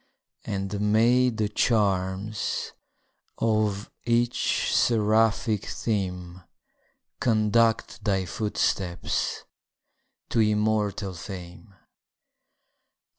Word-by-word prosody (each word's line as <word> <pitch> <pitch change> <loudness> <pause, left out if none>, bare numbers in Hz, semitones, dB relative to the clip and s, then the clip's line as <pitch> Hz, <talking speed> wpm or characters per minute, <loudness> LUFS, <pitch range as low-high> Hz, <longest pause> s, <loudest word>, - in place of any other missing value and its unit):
And 100 0 -2
may 120 +4 +4
the 110 -3 -1
charms 100 -1 0 0.7
of 110 -2 0
each 120 0 +1
seraphic 110 -1 +2
theme 90 -4 -3 0.8
Conduct 115 0 +2
thy 95 -3 0
footsteps 95 -2 -1 0.9
to - - 0
immortal 105 -2 +1
fame! 90 +2 -9
105 Hz, 65 wpm, -26 LUFS, 95-110 Hz, 0.9 s, may